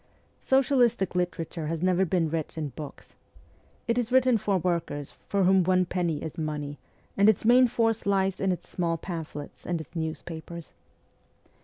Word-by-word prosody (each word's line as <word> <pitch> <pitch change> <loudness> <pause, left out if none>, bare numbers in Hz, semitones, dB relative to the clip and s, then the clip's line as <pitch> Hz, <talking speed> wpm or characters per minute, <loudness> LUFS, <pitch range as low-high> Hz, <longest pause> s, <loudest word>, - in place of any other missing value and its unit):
Socialistic 245 -7 +2
literature 175 -3 -2
has 165 +1 -3
never 185 +1 +3
been 175 -2 +1
rich 160 -1 -3
in 155 -2 -2
books. 145 +3 -10 0.7
It 235 +1 +2
is 240 0 -2
written 255 -3 +4
for 200 -1 +1
workers, 170 -5 -2 0.2
for 200 -1 +2
whom 190 0 +5
one 185 +1 +3
penny 170 -4 -1
is 160 +2 -6
money, 150 -2 -4 0.4
and 200 +2 +5
its 220 - +1
main 250 +2 +6
force 225 -2 0
lies 195 -1 +1
in 190 -1 +1
its 180 - -4
small 170 -2 -1
pamphlets 160 -5 -7
and 175 -2 -2
its 160 - -11
newspapers. 160 +1 -6
180 Hz, 160 wpm, -27 LUFS, 160-200 Hz, 0.7 s, main